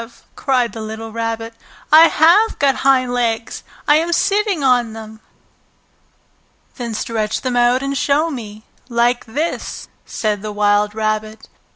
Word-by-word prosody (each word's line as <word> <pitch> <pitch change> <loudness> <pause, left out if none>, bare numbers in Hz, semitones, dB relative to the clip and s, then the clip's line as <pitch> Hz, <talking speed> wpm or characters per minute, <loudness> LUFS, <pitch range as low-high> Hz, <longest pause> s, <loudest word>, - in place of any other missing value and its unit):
cried 250 -5 0
the 225 - -7
little 220 +1 -7
Rabbit. 225 0 -4 0.4
"I 320 +2 +9
have 355 +10 +3
got 275 -2 +2
hind 255 -2 +2
legs! 230 -2 -2 0.3
I 295 0 +5
am 335 +2 -1
sitting 400 -3 +1
on 245 -4 +2
them!" 220 0 -10 1.6
"Then 235 -3 -5
stretch 220 -1 -2
them 255 -2 -2
out 245 +2 +2
and 275 0 -2
show 295 +4 +1
me, 215 -5 -8 0.3
like 240 +1 +1
this!" 295 +9 -4
said 210 -2 -3
the 215 0 -5
wild 205 0 +1
rabbit. 215 0 -3
240 Hz, 140 wpm, -18 LUFS, 220-275 Hz, 1.6 s, I